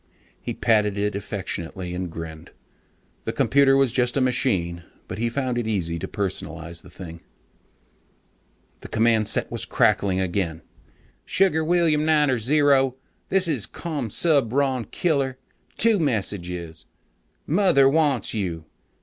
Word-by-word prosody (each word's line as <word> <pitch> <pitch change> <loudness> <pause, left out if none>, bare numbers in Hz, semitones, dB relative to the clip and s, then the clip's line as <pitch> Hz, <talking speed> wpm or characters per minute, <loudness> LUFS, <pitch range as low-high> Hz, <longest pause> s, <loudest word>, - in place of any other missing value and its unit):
He - - -4
patted 105 -3 +2
it 105 +1 0
affectionately 95 -3 -5
and 90 0 -3
grinned. 80 -1 -8 0.8
The - - -1
computer 135 -1 +4
was 135 -3 +3
just 125 +1 +1
a - - +4
machine, 95 -10 0 0.3
but 95 - -6
he 120 +1 0
found 125 -1 -1
it 115 - -3
easy 85 -6 -1
to - - -4
personalize 85 -4 -4
the 90 - -15
thing.... 85 -2 -10 1.6
The - - -9
command 110 -1 +2
set - - 0
was - - -4
crackling 95 -2 +2
again. 85 -3 -2 0.6
"Sugar 185 -4 +2
William 160 -2 +2
Niner 150 -5 +3
Zero, 135 +1 +3 0.3
this 190 -1 +2
is 135 -11 0
Commsubron 140 - 0
Killer. 140 -7 0 0.4
Two 225 -3 +4
messages. 90 - -3 0.6
Mother 160 -6 +4
wants 145 -3 +1
you. 85 -7 -3
115 Hz, 125 wpm, -24 LUFS, 90-140 Hz, 1.6 s, computer